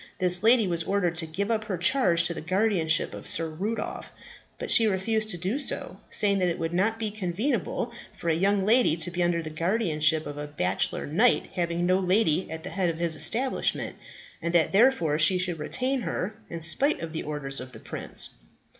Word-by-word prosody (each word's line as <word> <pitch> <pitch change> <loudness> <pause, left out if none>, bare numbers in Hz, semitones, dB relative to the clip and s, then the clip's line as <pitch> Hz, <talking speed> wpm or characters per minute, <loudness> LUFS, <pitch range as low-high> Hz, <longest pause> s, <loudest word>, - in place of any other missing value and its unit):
This 180 -1 +5
lady 225 +1 +4
was 170 -2 0
ordered 180 -1 -1
to 165 -1 0
give 200 +7 -3
up 220 -1 -1
her 195 -4 -4
charge 175 -2 +2
to 170 - -1
the - - -7
guardianship 180 -2 0
of - - -8
Sir 165 - +6
Rudolph; 205 +8 -5 0.5
but - - -4
she 225 - +6
refused 215 +2 0
to 180 - -2
do 190 - -3
so, 285 - -3
saying 200 -2 +1
that 180 - +1
it 170 - -3
would 165 +1 -4
not 210 +5 0
be 220 -2 -3
convenable 205 +6 -3 0.2
for - - -10
a 165 - +2
young 195 +3 0
lady 230 -6 +3
to 165 +1 0
be 175 +1 -3
under 175 -1 0
the 155 - -7
guardianship 160 -3 +1
of 145 0 -7
a 150 - -6
bachelor 95 -10 -1
knight 215 +12 +1
having 175 -1 -2
no 185 +1 +2
lady 185 -2 +1
at 160 0 -7
the 185 - -6
head 185 -3 -1
of 165 - -4
his 170 -1 -1
establishment, 255 +10 0 0.5
and 170 +1 -3
that 165 -2 +3
therefore 195 - +2
she 180 +4 +6
should 180 -3 -2
retain 255 - -1
her, 210 -2 -4 0.2
in 170 -1 -7
spite 265 - +4
of 165 -1 -7
the 160 - -4
orders 145 -2 -4
of 130 0 -9
the - - -12
Prince. - - 0
180 Hz, 205 wpm, -26 LUFS, 160-210 Hz, 0.5 s, Sir